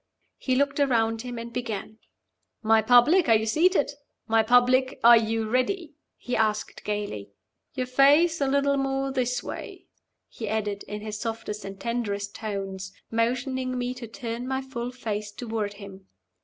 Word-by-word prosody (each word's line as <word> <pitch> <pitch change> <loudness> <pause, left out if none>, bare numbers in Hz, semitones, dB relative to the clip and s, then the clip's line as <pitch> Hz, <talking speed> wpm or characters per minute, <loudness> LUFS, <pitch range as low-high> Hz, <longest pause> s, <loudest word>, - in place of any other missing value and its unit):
He 255 - 0
looked 280 +1 +1
around 225 -5 +2
him, 245 0 -6
and 235 0 -7
began. 220 -2 -5 0.6
"My 220 0 +5
public, 245 - +5
are 225 - +7
you 220 0 +1
seated? 320 - +2 0.4
My 225 -1 +4
public, 250 +3 +3
are 235 +1 +9
you 225 -1 +1
ready?" 300 - -1 0.2
he 250 - -3
asked, 215 -1 -1
gayly. 205 - -4 0.5
"Your 255 -1 -1
face 290 +6 +4
a 275 - +2
little 280 +1 +2
more 270 0 -1
this 250 -2 -1
way," - - -8 0.4
he 220 -3 -6
added, 210 -2 -2
in 210 0 -5
his 215 0 -5
softest 225 -2 -4
and 195 0 -8
tenderest 205 -4 -3
tones, 195 -3 -5 0.2
motioning 255 +3 -1
to - - -3
me 245 0 -2
to 250 -2 -8
turn 235 +1 -5
my 265 0 -1
full 245 -2 -5
face 215 -4 -4
toward 220 -2 -4
him. 200 -2 -12
235 Hz, 160 wpm, -26 LUFS, 215-260 Hz, 0.6 s, are